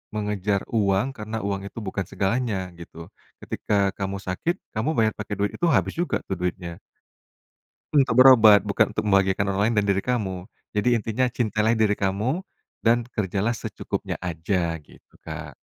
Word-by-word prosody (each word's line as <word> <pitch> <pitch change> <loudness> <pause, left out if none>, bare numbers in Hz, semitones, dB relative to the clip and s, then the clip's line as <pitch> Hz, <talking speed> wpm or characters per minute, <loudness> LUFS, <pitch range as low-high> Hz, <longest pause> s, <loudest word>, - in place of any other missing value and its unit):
mengejar 105 -1 -1
uang, 100 +2 +2
karena 110 +1 -5
uang 100 -1 -2
itu 115 - -8
bukan 95 0 -2
segalanya, 110 +3 0 0.2
gitu. 85 - -12 0.4
Ketika 105 - -4 0.2
kamu 100 0 -3
sakit, 130 - -1 0.2
kamu 110 +8 0
bayar 110 -1 +3
pakai 105 - -4
duit 100 0 +1
itu - - -12
habis 95 -1 +1
juga 175 - 0
tuh 95 - -2
duitnya. 90 -1 -3 1.2
Untuk 130 -4 +5
berobat, 110 -6 +8
bukan - - +1
untuk - - -1
membahagiakan 100 -1 +2
orang 95 - -1
lain 115 - 0
dan - - -2
diri 95 - +1
kamu. 100 -5 -2 0.2
Jadi 105 +3 +1
intinya 115 +3 0
cintailah 110 -2 0
diri 110 -2 +2
kamu, 105 - 0 0.4
dan 120 +1 +3
kerjalah 105 +1 -1
secukupnya 115 - -4
aja, 85 0 -1
gitu, 75 - -21
Kak. - - -8
105 Hz, 155 wpm, -24 LUFS, 95-115 Hz, 1.2 s, berobat